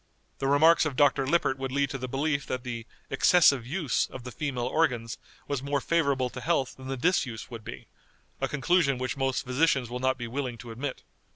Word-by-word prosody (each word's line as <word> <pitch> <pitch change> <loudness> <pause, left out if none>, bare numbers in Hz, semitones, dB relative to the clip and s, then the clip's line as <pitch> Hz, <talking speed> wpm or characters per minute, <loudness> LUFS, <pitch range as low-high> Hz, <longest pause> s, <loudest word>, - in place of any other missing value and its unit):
The 135 - -1
remarks 155 +4 +5
of 140 - -5
Dr. 140 -1 +3
Lippert 135 -3 +1
would 135 -1 -3
lead 140 -1 0
to 135 - -4
the 130 - -4
belief 140 +2 -1
that 130 -1 -3
the 115 -2 -5 0.2
excessive 140 -3 +4
use 150 -3 0
of 130 - -9
the 125 - -7
female 130 -3 -3
organs 125 -5 0 0.3
was 140 -3 -2
more 140 +1 0
favorable 140 -5 +1
to 125 - -7
health 140 -3 0
than 130 0 -10
the 135 0 -3
disuse 125 -7 0
would 115 -2 -8
be, - - -8 0.5
a - - 0
conclusion 150 -1 +2
which 130 +1 -3
most 135 -1 -1
physicians 130 -1 +1
will 125 - -3
not 130 +1 +1
be 120 -1 -5
willing 125 -1 -3
to 120 0 -9
admit. 130 +4 -5
135 Hz, 205 wpm, -28 LUFS, 125-145 Hz, 0.5 s, remarks